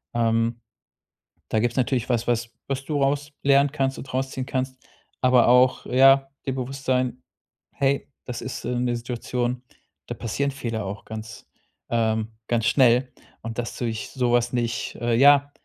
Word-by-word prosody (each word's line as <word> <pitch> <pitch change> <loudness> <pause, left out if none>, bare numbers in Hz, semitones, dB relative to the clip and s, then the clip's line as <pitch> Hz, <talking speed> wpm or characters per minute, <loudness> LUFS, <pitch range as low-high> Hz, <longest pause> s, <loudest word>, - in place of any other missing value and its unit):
Ähm, 115 0 +1 0.9
da 110 - +1
gibt's 120 +2 0
natürlich 125 -2 +1
was, 120 -1 0
was 120 -1 0 0.2
was 135 0 -3
du 145 -1 -1
raus 145 +2 0
lernen 140 0 +4
kannst 135 -2 -1
und 130 - -9
rausziehen 130 0 -2
kannst, 130 -1 -2 0.4
aber 125 -2 +5
auch, 125 +1 +4
ja 135 +1 +5 0.2
dir 135 - -1
bewusst 135 +1 -5
sein: 130 -1 0 0.5
„Hey, 140 0 0 0.2
das 125 - -5
ist, 130 - -6
äh, - - -2
'ne 120 -1 0
Situation, 120 +1 -3 0.4
da - - -4
passieren 140 +5 -2
Fehler 115 -6 -4
auch 100 +2 -6
ganz 110 0 -8 0.4
ähm, 110 -1 0 0.2
ganz 115 -2 0
schnell 125 -1 +4 0.3
und 115 +1 -5
das 115 - -4
durch 115 -3 -3
sowas 120 -1 +1
nicht 120 -1 -2
äh, 120 -1 +1
ja“ 140 +3 +6
125 Hz, 155 wpm, -24 LUFS, 115-135 Hz, 0.9 s, ja